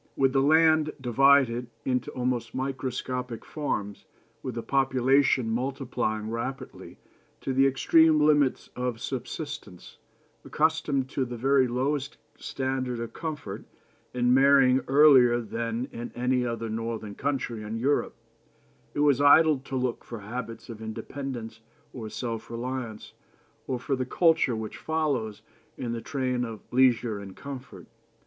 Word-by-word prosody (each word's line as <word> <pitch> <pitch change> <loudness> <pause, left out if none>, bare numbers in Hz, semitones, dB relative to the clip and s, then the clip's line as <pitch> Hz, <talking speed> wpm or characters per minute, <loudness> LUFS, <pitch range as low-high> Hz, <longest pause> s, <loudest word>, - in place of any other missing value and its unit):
With 135 -1 +2
the 135 - +3
land 155 +1 +4
divided 125 -1 +3 0.2
into 125 -1 0
almost 125 -2 -2
microscopic 125 -2 -4
farms, 105 -9 -4 0.3
with 125 -2 -5
a 115 - -3
population 135 -1 +2
multiplying 120 -4 -2
rapidly 125 +4 -6 0.4
to 135 - -2
the 135 +1 +4
extreme 155 +3 +4
limits 145 -3 +2
of 125 -2 -3
subsistence, 130 - -6 0.4
accustomed 150 -4 0
to 135 - -1
the 120 -1 -5
very 135 +1 +3
lowest 135 +3 -2 0.2
standard 130 -2 -3
of 115 -1 -5
comfort, 150 - -6 0.5
and 125 0 +2
marrying 135 -1 +5
earlier 135 -4 +6
than 115 +2 -3
in 120 +1 -7
any 125 0 +1
other 115 -1 -3
northern 110 -1 -4
country 125 -3 -2
in 110 +1 -5
Europe, 140 +5 0 0.8
it 145 - 0
was 145 -2 +4
idle 150 0 +6
to 135 0 -7
look 125 -2 -2
for 115 -3 -8
habits 115 +1 -6
of 110 -2 -9
independence 115 0 -6 0.3
or 110 -4 -6
self 115 -1 -5
reliance, 120 -2 -5 0.5
or 130 - -1
for 135 +3 -2
the 130 -1 -3
culture 160 -6 +3
which 110 -1 -6
follows 140 -10 -2 0.3
in 120 - -4
the 115 -1 -3
train 130 -3 -1
of 115 -3 -5
leisure 120 -4 +3
and 95 -1 -10
comfort. 130 -9 -9
125 Hz, 135 wpm, -27 LUFS, 115-135 Hz, 0.8 s, earlier